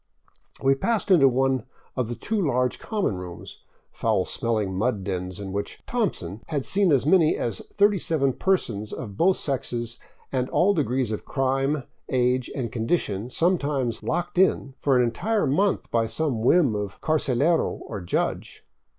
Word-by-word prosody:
We 135 Hz, 0 st, +5 dB
passed 210 Hz, +8 st, -1 dB
into 140 Hz, -7 st, +7 dB
one 130 Hz, -1 st, +1 dB, 0.3 s
of 125 Hz, -3 st, -1 dB
the 120 Hz, -, -4 dB
two 215 Hz, -, -2 dB
large 125 Hz, -6 st, 0 dB
common 205 Hz, -, -1 dB
rooms, 90 Hz, -1 st, -9 dB, 0.3 s
foul -, -, 0 dB
smelling 110 Hz, -5 st, -1 dB
mud 105 Hz, 0 st, 0 dB
dens 95 Hz, 0 st, -4 dB
in 100 Hz, -1 st, -6 dB
which 100 Hz, +1 st, -4 dB
" -, -, -46 dB
Thompson 115 Hz, -, -2 dB
" -, -, -26 dB
had 145 Hz, -4 st, -2 dB
seen 195 Hz, -3 st, +2 dB
as 135 Hz, -2 st, +3 dB
many 160 Hz, -1 st, +4 dB
as 115 Hz, -5 st, -2 dB
37 165 Hz, -9 st, +2 dB
persons 115 Hz, -, -1 dB
of 105 Hz, -6 st, -6 dB
both 185 Hz, -, +3 dB
sexes 120 Hz, -4 st, -3 dB, 0.3 s
and 130 Hz, -1 st, -1 dB
all 200 Hz, +4 st, +3 dB
degrees 130 Hz, -, 0 dB
of 110 Hz, -, -3 dB
crime, 135 Hz, +1 st, 0 dB, 0.3 s
age, 125 Hz, 0 st, +1 dB
and 120 Hz, -5 st, -3 dB
condition 115 Hz, -, -1 dB
sometimes 140 Hz, -, 0 dB
locked 175 Hz, +1 st, -2 dB
in 140 Hz, -7 st, +2 dB
for 135 Hz, -3 st, +3 dB
an 125 Hz, -, +4 dB
entire 210 Hz, -, 0 dB
month 190 Hz, +9 st, +1 dB
by 115 Hz, -1 st, +2 dB
some 115 Hz, 0 st, -1 dB
whim 135 Hz, 0 st, +4 dB
of 105 Hz, -1 st, -4 dB
carcelero 155 Hz, +1 st, +1 dB
or 105 Hz, -3 st, -6 dB
judge. 85 Hz, -, -3 dB
130 Hz, 160 wpm, -25 LUFS, 115-160 Hz, 0.3 s, into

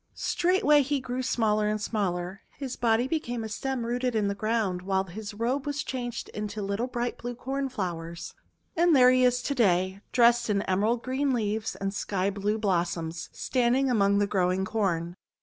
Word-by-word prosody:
Straightway 345 Hz, -5 st, +3 dB
he 280 Hz, +1 st, 0 dB
grew 255 Hz, 0 st, -3 dB
smaller 215 Hz, -4 st, +1 dB
and 215 Hz, 0 st, 0 dB
smaller. 190 Hz, -3 st, -2 dB, 0.2 s
His 265 Hz, -3 st, -5 dB
body 235 Hz, +1 st, +2 dB
became 245 Hz, -6 st, -2 dB
a -, -, -3 dB
stem 255 Hz, +2 st, -3 dB
rooted 245 Hz, +1 st, -1 dB
in 210 Hz, -2 st, +1 dB
the -, -, 0 dB
ground, 210 Hz, -3 st, -1 dB
while 190 Hz, 0 st, 0 dB
his 205 Hz, +3 st, -8 dB
robe 255 Hz, +6 st, -1 dB
was 290 Hz, +1 st, -2 dB
changed 245 Hz, -2 st, -4 dB
into 210 Hz, 0 st, -5 dB
little, 200 Hz, +5 st, -1 dB
bright 245 Hz, -1 st, -3 dB
blue 245 Hz, 0 st, -5 dB
Cornflowers. 190 Hz, -11 st, -4 dB, 0.4 s
And 335 Hz, -1 st, +4 dB
there 250 Hz, -1 st, +7 dB
he 255 Hz, 0 st, +4 dB
is 250 Hz, 0 st, +3 dB
to 280 Hz, -, -1 dB
day, 190 Hz, -5 st, +2 dB
dressed 240 Hz, -1 st, +4 dB
in 200 Hz, -1 st, +1 dB
emerald 215 Hz, +6 st, +1 dB
green 265 Hz, +1 st, 0 dB
leaves 215 Hz, -1 st, -2 dB
and 195 Hz, 0 st, -3 dB
sky 200 Hz, -1 st, -1 dB
blue 205 Hz, +2 st, -1 dB
blossoms, 170 Hz, -5 st, -1 dB
standing 255 Hz, +1 st, +1 dB
among 200 Hz, -3 st, +3 dB
the 205 Hz, -, +3 dB
growing 190 Hz, -1 st, +1 dB
Corn. 175 Hz, -6 st, -1 dB
220 Hz, 175 wpm, -27 LUFS, 195-250 Hz, 0.4 s, there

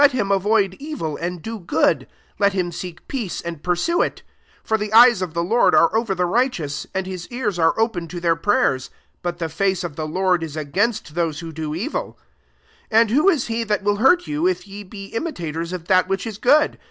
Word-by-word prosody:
1^ 285 Hz, -, +8 dB
him 235 Hz, -7 st, -1 dB
avoid 195 Hz, 0 st, +2 dB
evil, 275 Hz, -, -4 dB
and 175 Hz, 0 st, -4 dB
do 225 Hz, 0 st, -5 dB
good; 175 Hz, -, +1 dB, 0.3 s
let 200 Hz, -1 st, +3 dB
him 180 Hz, -2 st, -1 dB
seek 175 Hz, 0 st, -8 dB
peace 235 Hz, -10 st, -3 dB
and 170 Hz, -3 st, -6 dB
pursue 180 Hz, -, +1 dB
it -, -, -2 dB, 0.4 s
12 -, -, -31 dB
For 220 Hz, -, +2 dB
the 210 Hz, 0 st, -3 dB
eyes 235 Hz, -2 st, +7 dB
of 175 Hz, -3 st, -4 dB
the 170 Hz, -, 0 dB
Lord 230 Hz, +7 st, +3 dB
are 165 Hz, +5 st, +4 dB
over 225 Hz, -3 st, +1 dB
the 180 Hz, 0 st, +1 dB
righteous, 175 Hz, -, -1 dB
and 190 Hz, 0 st, -1 dB
his 185 Hz, -2 st, -6 dB
ears 225 Hz, -7 st, -3 dB
are 165 Hz, +5 st, +2 dB
often 215 Hz, -7 st, 0 dB
to 175 Hz, +1 st, -6 dB
their 170 Hz, -1 st, +2 dB
prayers: 155 Hz, -7 st, +1 dB, 0.3 s
but 175 Hz, 0 st, -3 dB
the 165 Hz, -, -2 dB
face 190 Hz, +3 st, 0 dB
of 165 Hz, -4 st, -6 dB
the 155 Hz, -1 st, -3 dB
Lord 180 Hz, +1 st, +1 dB
t> 155 Hz, -1 st, -5 dB
against 195 Hz, +4 st, -1 dB
those 165 Hz, -2 st, -1 dB
who 165 Hz, -1 st, -7 dB
do 155 Hz, -1 st, -4 dB
evil." 300 Hz, -, -4 dB, 0.7 s
13 220 Hz, -, +5 dB
And 230 Hz, -1 st, +4 dB
who 315 Hz, +7 st, +4 dB
t« 235 Hz, -3 st, -3 dB
he 230 Hz, 0 st, -1 dB
that 210 Hz, -2 st, -1 dB
will 205 Hz, 0 st, +1 dB
hurt 345 Hz, -, +4 dB
you, 305 Hz, +4 st, 0 dB
if 370 Hz, -, -1 dB
ye 200 Hz, +1 st, -8 dB
be 195 Hz, 0 st, -9 dB
imitators 170 Hz, -, -4 dB
of 180 Hz, -3 st, -5 dB
that 185 Hz, 0 st, +3 dB
which 195 Hz, +2 st, -2 dB
is 220 Hz, -2 st, -6 dB
good 290 Hz, +4 st, +3 dB
190 Hz, 225 wpm, -21 LUFS, 170-230 Hz, 0.7 s, 1^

